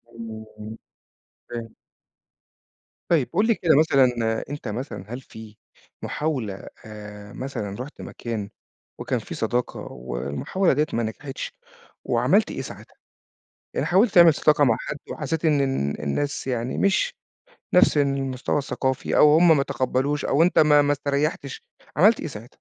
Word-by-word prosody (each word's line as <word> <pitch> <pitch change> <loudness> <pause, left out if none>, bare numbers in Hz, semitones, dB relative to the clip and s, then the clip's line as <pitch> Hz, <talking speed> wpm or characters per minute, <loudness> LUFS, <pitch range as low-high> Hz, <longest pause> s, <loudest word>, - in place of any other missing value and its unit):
إمم 110 -1 -8 1.0
فاهم. 115 -2 -6 1.4
طيب 155 -7 +2
قُل 205 +5 +2
لي 230 - +3
كده 160 -5 +3
مثلًا، 125 -7 +2
أنت 145 +1 -6
مثلًا 105 -3 -5
هل 130 - -5
في 110 -3 -13 0.4
محاولة 130 -10 -3 0.2
آآ، 105 -1 -10
مثلًا 105 -7 -5
رُحت 135 +4 -8
مكان 110 -4 -5 0.5
وكان - - -1
في - - -8
صداقة 125 0 -2
والمحاولة 65 - -1
دِيّة 150 +3 +2
ما 115 - 0
نجحِتش، 135 +5 -5 0.5
وعملت - - +2
إيه - - -4
ساعتها؟ - - -11 0.8
يعني - - -1
حاولت 195 +4 +3
تعمل 170 -3 +8
صداقة 150 0 +3
مع 115 -5 +3
حد - - -5
وحسّيت 160 +2 -3
إن 150 -3 +3
إن 135 - 0
إن - - -8
الناس 140 - -2
يعني 125 -1 -2
مش 210 - +2 0.6
نفس 180 -4 +5
المستوى 135 -1 0
الثقافي 130 -1 -2
أو 150 0 +7
هُم 165 -2 +6
ما 140 - +2
تقبّلوش 135 +3 -1
أو 145 +4 +3
أنت 180 - +3
ما 150 -1 +6
ما 145 0 +2
استريّحتش، 140 -1 -2 0.3
عملت 210 +8 +5
إيه - - -4
ساعتها؟ 115 -4 -8
135 Hz, 145 wpm, -24 LUFS, 115-150 Hz, 1.4 s, تعمل